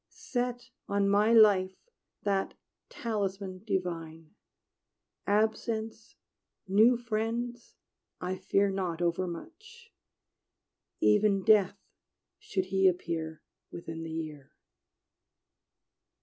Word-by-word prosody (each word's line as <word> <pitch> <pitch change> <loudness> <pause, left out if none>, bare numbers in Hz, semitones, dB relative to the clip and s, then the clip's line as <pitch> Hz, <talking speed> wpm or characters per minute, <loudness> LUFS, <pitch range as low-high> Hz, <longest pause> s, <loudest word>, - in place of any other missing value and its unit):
Set 245 -1 -4 0.2
on 200 0 +2
my 205 +3 +4
life 200 -4 +5 0.5
that 195 -1 0 0.3
talisman 195 -4 -3
divine; 165 -5 -4 0.9
Absence, 220 +1 -1 0.5
new 220 +6 +5
friends, 235 +1 -3 0.4
I 185 +1 -3
fear 200 +1 +1
not 180 -3 -2
overmuch 330 - -5 1.1
Even 210 -2 +3
Death, 205 -2 +4 0.6
should 195 - -2
he 190 0 +5
appear 165 -3 -2 0.3
Within 165 -1 -7
the 165 - -6
year! 155 -4 -6
200 Hz, 80 wpm, -30 LUFS, 180-225 Hz, 1.1 s, life